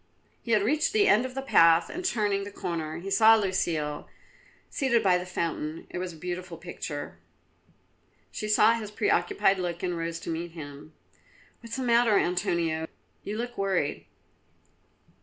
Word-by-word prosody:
He 230 - -1
had 210 -2 +4
reached 300 - +1
the 420 -2 +4
end 230 +5 +4
of 255 - -12
the 270 - -3
path 165 -9 +5
and 360 - -6
turning 210 - 0
the 200 - -6
corner 170 -3 -5
saw 220 +3 +7
Lucile 170 -7 -1 0.6
seated 240 -5 +1
by 180 -2 +4
the 180 - -7
fountain. 165 -3 -3
It - - -4
was 180 0 -4
a - - -12
beautiful 180 +1 -6
picture. 160 -3 -7 1.1
She 215 - -5
saw 215 +1 +5
his 225 -3 -4
preoccupied 395 - +1
look 175 -1 -4
and 180 -1 -1
rose 165 0 -3
to - - -5
meet 165 +1 -4
him. 145 -1 -10 0.7
"What 230 - -12
is - - -4
the 265 - -3
matter, 235 -3 +4
Antonio? 170 -2 0 0.4
You 210 +1 -4
look 240 -1 -5
worried." 190 -7 -1
185 Hz, 160 wpm, -27 LUFS, 165-225 Hz, 1.1 s, saw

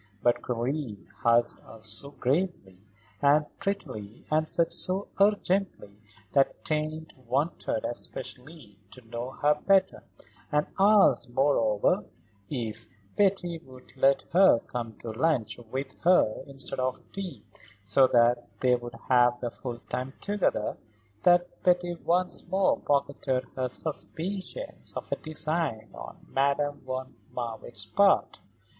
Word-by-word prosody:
But 120 0 +2
Karen 120 -3 -3 0.2
asked 120 0 +3
her 110 0 -14
so 110 +6 +1
gravely 140 - -1 0.4
and 145 +2 +5
prettily 130 - -4
and 155 +1 +2
said 170 +1 +1
so 190 +2 +2
urgently 195 - +2 0.4
that 135 - +2
Tante 155 +1 -2
wanted 135 -2 -1
especially 125 -2 -7
to 125 0 -13
know 120 +2 -4
her 145 +2 +2
better, 195 -1 +3 0.5
and 150 0 +2
asked, 205 - +5
moreover, 120 -5 +2 0.4
if 115 -4 -4 0.3
Betty 190 -4 +1
would 130 -4 -15
let 135 +1 +3
her 190 -7 +7
come 115 -3 -5
to 115 - -5
lunch 120 -3 0
with 135 +2 -4
her 170 -11 +3
instead 135 -2 -5
of 130 0 -1
tea, 195 -3 -6 0.4
so 105 +6 +5
that 120 0 +3
they 125 -1 +4
should 120 +1 -8
have 125 -1 +4
their 120 -1 -3
full 120 -1 -6
time 130 +1 -3
together, 200 - 0 0.4
that 175 0 +3
Betty 180 -1 +2
once 180 +2 -1
more 190 +1 +2
pocketed 140 -2 0
her 130 -1 -1
suspicions 185 - -5
of - - -6
a - - +2
design 155 -7 -3
on - - -10
Madame 140 +1 +1
von 130 0 -4 0.2
Marwitz's 115 -3 -4
part. 200 - +3
135 Hz, 125 wpm, -28 LUFS, 120-170 Hz, 0.5 s, her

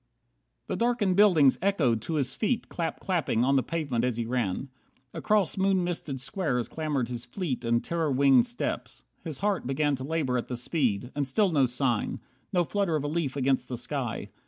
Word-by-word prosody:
58 - - -48
The - - -2
darkened 230 -6 +1
buildings 175 -10 +5
echoed 150 - +2
to 160 +8 -3
his 135 -3 0
feet 230 +2 -1
Clap 165 -2 -3
clapping 165 - 0
on 135 +2 +3
the 135 - +4
pavement 140 -7 -2
as 125 -2 0
he 115 - -1
ran. 120 0 -2 0.4
Across 205 -5 +1
moon 190 -1 +3
misted 160 -6 -3
squares 135 -2 -1
clamoured 150 -6 -2
his 120 -1 -4
fleet 130 0 -4
And 115 0 +1
terror 165 -3 -1
winged 135 -2 +5
steps. - - -4 0.2
His 155 -5 -6
heart 200 -8 0
began 145 +2 +1
To 130 - -6
labour 140 -4 0
at - - -6
the 125 - -4
speed. 125 -3 -1
And 145 -2 -1
still 195 +8 +2
no 140 -5 +3
sign, 125 -2 -1 0.3
No 180 -3 +3
flutter 195 -1 0
of 150 - -1
a - - -1
leaf 150 -3 -1
against 130 -2 +1
the 125 - -3
sky. 125 -1 -4
140 Hz, 195 wpm, -28 LUFS, 125-170 Hz, 0.4 s, buildings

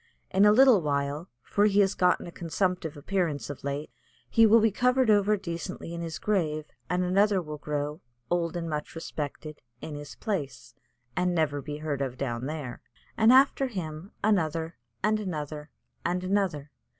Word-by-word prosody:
In 195 +2 +5
a 210 - +7
little 250 -3 +7
while, 145 +2 -1
for 205 +1 +2
he 205 0 +3
has 195 -1 +3
gotten 180 0 +2
a 175 - -8
consumptive 170 -2 -2
appearance 155 -2 -1
of 145 - -10
late, 140 0 -3 0.4
he 225 -1 +6
will 225 +2 +7
be 220 0 +3
covered 250 +2 +3
over 210 0 +4
decently 170 -2 -6
in 170 - -4
his 165 -1 -4
grave, 155 -7 0 0.2
and 180 +1 +1
another 195 +2 +3
will 150 -3 -6
grow, 150 +1 -3 0.3
old 175 0 0
and 170 -1 -3
much 150 0 -4
respected, 155 -1 -6 0.2
in 155 - -7
his 145 0 -8
place, 135 - -4 0.4
and 180 0 +1
never 145 -3 +1
be 145 +1 -6
heard 150 -2 -3
of 130 -2 -3
down 125 -1 -3
there, 145 -5 -5 0.3
and 225 +1 +5
after 270 +1 +5
him 175 -5 -6
another 165 -5 +1 0.3
and 215 +1 +2
another 150 -6 -5 0.3
and 180 +1 -1
another. 185 -7 -1
170 Hz, 170 wpm, -28 LUFS, 150-200 Hz, 0.4 s, a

